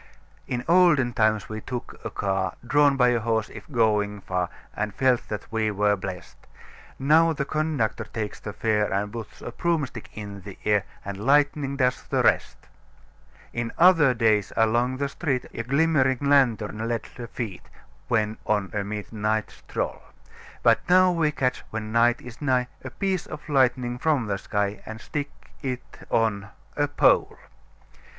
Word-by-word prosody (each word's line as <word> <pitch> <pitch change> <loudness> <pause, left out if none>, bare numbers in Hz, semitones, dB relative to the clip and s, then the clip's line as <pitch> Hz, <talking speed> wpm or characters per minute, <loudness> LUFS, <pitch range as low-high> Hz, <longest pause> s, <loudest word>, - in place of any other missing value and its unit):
"In 125 0 -3
olden 165 -8 +4
times 110 -2 +2
we 110 0 -6
took 125 +1 -6
a - - -3
car 95 -1 -1
Drawn 145 +1 +4
by 125 -1 +5
a 120 -1 +2
horse, 110 -1 0
if - - -11
going 105 -4 +1
far, 90 -2 -2 0.3
And 105 -1 -3
felt 130 -2 +2
that 105 -2 -5
we 110 -1 +1
were 105 0 +2
blest; 95 -2 -7 0.6
Now 160 +4 +4
the 140 -2 -2
conductor 155 -7 -1
takes 105 -2 -5
the 105 - -6
fare 105 0 0
And 100 +2 -1
puts 115 -2 -8
a - - -5
broomstick 145 -6 -2
in 100 -2 -7
the 100 0 -10
air 105 -3 +2 0.2
And 100 -1 -5
lightning 140 +1 +2
does 125 -2 +1
the - - -1
rest. - - +2 1.0
"In 120 -1 -3
other 165 -7 +6
days, 110 -3 +2
along 120 +3 +2
the 140 +1 -1
street, 140 -3 -2
A - - -3
glimmering 135 0 +2
lantern 115 -6 +2
led 115 -2 -1
the 120 -1 -7
feet, 110 -5 -6 0.4
When 110 -2 0
on 105 -2 0
a 105 -1 -1
midnight 105 +1 -2
stroll; - - -4 0.6
But - - +5
now 185 0 +6
we 165 -3 +2
catch, 130 -3 -1
when 110 -1 -5
night 120 +1 +3
is 125 +1 -11
nigh, 130 -3 +1
A 130 - -5
piece 190 +4 -2
of 150 - -9
lightning 125 -3 +2
from 150 -6 +1
the 100 -2 -2
sky 105 0 -2
And 110 0 -8
stick 145 +4 -4 0.3
it 130 -2 -6
on 100 -3 +1 0.3
a 145 0 +1
pole. 145 - +3
120 Hz, 160 wpm, -25 LUFS, 105-140 Hz, 1.0 s, other